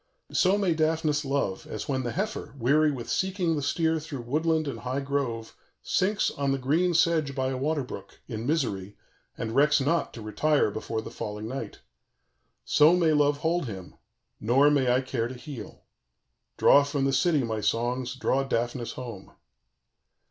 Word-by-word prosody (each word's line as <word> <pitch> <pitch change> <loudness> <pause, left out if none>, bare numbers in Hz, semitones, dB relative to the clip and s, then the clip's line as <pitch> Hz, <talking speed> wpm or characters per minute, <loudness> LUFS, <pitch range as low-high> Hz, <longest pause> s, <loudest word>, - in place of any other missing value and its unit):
_ - - -7
"So 190 +2 +4
may 195 -4 +2
Daphnis 155 -1 +1
love, 135 -9 -2
as 110 - -5
when 130 -2 0
the 120 -2 -3
heifer, 210 -5 -4
weary 145 +5 +3
with 125 -4 -6
seeking 185 -3 0
the 145 - -2
steer 160 +3 +1
through 150 -4 -6
woodland 155 +4 0
and 125 -5 -4
high 130 +3 -3
grove, 135 -5 -3 0.3
sinks 200 +3 +1
on 140 -1 -1
the 135 - +1
green 165 +7 +1
sedge 160 -4 +2
by 130 -1 0
a 135 - -2
water 145 +2 0
brook, 125 - -10
in 115 -1 -5
misery, 105 - -1 0.4
and 110 - -3
recks 150 +2 +4
not 155 +5 0
to 115 - -8
retire 145 +3 +1
before 110 +1 -4
the - - -8
falling 105 +1 -5
night: 130 +3 -6 0.8
so 155 +4 +5
may 165 -3 +3
love 145 -1 +3
hold 165 -2 0
him, 95 -5 -8 0.5
nor 135 +6 +4
may 135 -4 +3
I 125 +1 +3
care 130 -3 -2
to 130 - -8
heal. 125 -5 -9 0.7
"_Draw 140 - +6
from 140 -2 0
the 135 - +1
city, 150 0 +2
my 110 -2 -2
songs, 125 +3 -1
draw 130 +1 +1
Daphnis 120 -2 -2
home. 115 -7 -8
140 Hz, 175 wpm, -27 LUFS, 120-155 Hz, 0.8 s, Draw